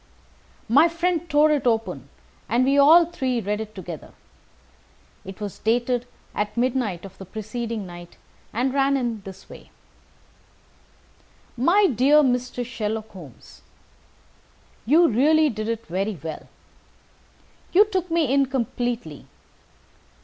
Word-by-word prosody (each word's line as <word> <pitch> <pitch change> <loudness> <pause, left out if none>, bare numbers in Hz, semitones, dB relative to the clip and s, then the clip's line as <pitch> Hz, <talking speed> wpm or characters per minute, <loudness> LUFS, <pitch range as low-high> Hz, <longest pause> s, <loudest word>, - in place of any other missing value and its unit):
My 280 +9 +5
friend 340 0 -1
tore 300 +1 +4
it 285 -4 +1
open, 195 - -1 0.4
and 240 +4 +2
we 275 +1 +2
all 310 +5 +7
three 265 -7 -2
read 210 0 -2
it 215 -1 -8
together. 175 -5 -9 1.1
It 190 0 -10
was 205 -2 -6
dated 240 +2 0 0.3
at 210 +1 -3
midnight 235 -8 -1
of 195 - -13
the - - -7
preceding 220 +2 -5
night, 175 -1 -11 0.3
and 255 +4 -1
ran 275 0 +2
in 235 -5 -3
this 190 0 -12
way: - - -13 1.9
"My 350 - +4
dear 285 - +4
Mr. 250 -1 -1
Sherlock 220 -2 -4
Holmes, 160 - -14 1.3
You 330 +6 +5
really 300 +6 +3
did 215 0 -4
it 230 0 -3
very 195 +3 -3
well. 160 -2 -7 1.2
You 405 +4 +6
took 375 -4 -3
me 325 -5 +1
in 275 -1 +3
completely. 245 - -3
240 Hz, 125 wpm, -23 LUFS, 210-280 Hz, 1.9 s, all